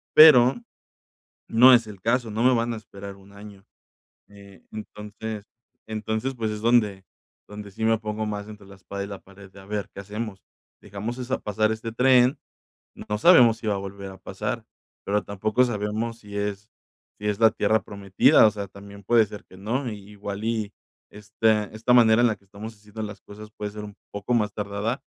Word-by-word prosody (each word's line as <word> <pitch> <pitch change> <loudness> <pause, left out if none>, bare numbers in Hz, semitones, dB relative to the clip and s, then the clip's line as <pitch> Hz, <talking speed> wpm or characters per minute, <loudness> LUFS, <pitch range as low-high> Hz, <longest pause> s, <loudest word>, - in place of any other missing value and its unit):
pero, 135 -5 +9 0.9
no 125 +3 +7
es 120 -2 +3
el 100 -3 -11
caso 115 +1 +1
no 110 +2 -2
me 130 - +6
van 115 0 0
a - - -5
esperar 100 -2 -10
1 100 +1 -18
año, 100 -1 -13 0.6
eh, 100 -1 -16
entonces 105 0 -7 0.4
entonces, 110 +4 -3
pues, 110 -3 -2
es 105 0 -5
donde 105 -5 +2 0.4
donde 105 0 -9
sí 105 +3 -5
me 115 0 +3
pongo 110 0 -4
más 105 -1 -5
entre 105 -2 -12
la 100 - -13
espada 100 +1 -6
y - - -6
la 100 -2 -8
pared 100 0 -16
de, 100 - -13
¿a 95 - -15
ver, 105 0 -3
qué - - -7
hacemos?, 105 0 -6 0.4
dejamos 105 +4 -5
esa 130 +1 -2
pasar 110 +1 0
este 110 +1 -5
tren, 125 +2 +4 0.6
no 105 - -4
sabemos 120 - +7
si 110 - -7
va 105 - +1
a - - -2
volver 100 0 -7
a 95 - -12
pasar, 95 - -5 0.4
pero 105 +1 0
tampoco 110 +4 +1
sabemos 110 +1 -3
si 105 -2 -11
es 100 0 -3 0.5
si 105 - -3
es 105 0 -1
la 110 -1 +6
tierra 110 -1 +1
prometida, 100 0 +4
o - - +2
sea, 100 -1 -6
también 100 +1 -13
puede 115 +2 +4
ser 105 0 -11
que - - -17
no, 120 +7 -2
i 105 - -7
igual 100 0 -6
y 110 -3 -2 0.4
esta 105 +1 0
esta 115 +3 +1
manera 115 -2 +6
en 120 - +5
la 110 - 0
que - - -31
estamos 105 +3 -9
haciendo 105 +1 -10
las 105 -1 -7
cosas 105 +1 -12
puede 105 0 -4
ser 105 0 -8
un 105 -1 -11 0.2
poco 100 +4 -3
más 105 -3 +1
tardada, 105 +4 -3
105 Hz, 200 wpm, -25 LUFS, 100-115 Hz, 0.9 s, pero